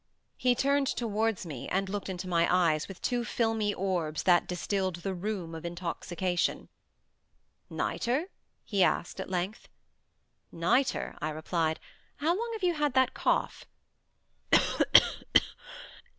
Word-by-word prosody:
He 250 -1 +2
turned 280 +2 +2
towards 225 -4 -1
me, 145 -7 -6
and 195 +1 0
looked 200 0 -4
into 185 0 -5
my 170 -1 +2
eyes 170 -4 +2
with 195 - -11
two 245 -1 0
filmy 225 -2 0
orbs 175 -6 -2
that 175 -2 +4
distilled 185 +1 -1
the 190 +2 -4
rheum 185 -3 -4
of 160 0 -7
intoxication. 175 +1 -2 1.0
"Nitre?" 275 +10 -1 0.3
he 200 -3 0
asked, 180 - +1
at 190 - -5
length. 185 +4 -3 0.8
"Nitre," 210 +11 +1
I 155 - -1
replied. 160 +1 -1 0.4
"How 300 +3 -1
long 465 +4 -3
have 440 -3 -6
you 355 -1 +3
had 295 -4 0
that 260 -1 +4
cough?" - - 0
190 Hz, 125 wpm, -29 LUFS, 175-235 Hz, 1.0 s, that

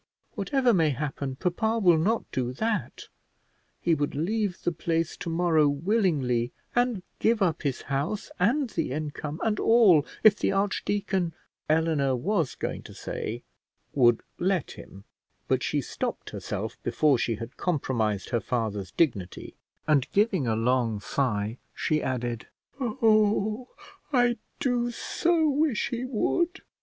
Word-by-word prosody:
Whatever 265 -4 +1
may 165 -5 +3
happen, 140 -1 -3
papa 220 - 0
will 175 -7 +5
not 220 +8 +1
do 125 -1 -2
that: 220 - -2 0.7
he 170 - +2
would 145 -2 -1
leave 200 +5 -1
the 175 - +1
place 165 -1 -1
to 170 - -5
morrow 165 -3 +3
willingly, 145 - +1 0.2
and 240 -6 +1 0.2
give 225 0 +3
up 175 -5 +1
his 140 -5 -2
house, 145 +10 -2
and 240 +7 +2
the 160 -6 -2
income 150 +1 -4
and 215 -2 +1
all, 215 -10 +6 0.2
if 215 -1 +7
the - - +1
archdeacon 195 -3 0 0.2
" - - -47
Eleanor 145 -5 +1
was 165 - 0
going - - -4
to - - -12
say - - -5 0.5
"would 120 -4 +4 0.2
let 185 -3 0
him," 95 +1 -12 0.4
but - - +1
she - - 0
stopped - - -4
herself - - -5
before 145 -5 +2
she 115 - 0
had 115 +2 -8
compromised 115 - -1
her 120 -2 0
father's 105 -4 -2
dignity; 100 - -1 0.3
and 150 -4 +2
giving 200 - +2
a 110 - +1
long 115 -1 +1
sigh, 110 -1 -1 0.2
she 155 -1 0
added 120 -3 -3 0.3
"Oh, 215 -1 +2 0.4
I 245 -3 +3 0.2
do 245 -2 +1
so 325 +6 +1
wish 290 -4 +1
he 245 -1 -3
would." 345 - 0
165 Hz, 140 wpm, -27 LUFS, 130-220 Hz, 0.7 s, if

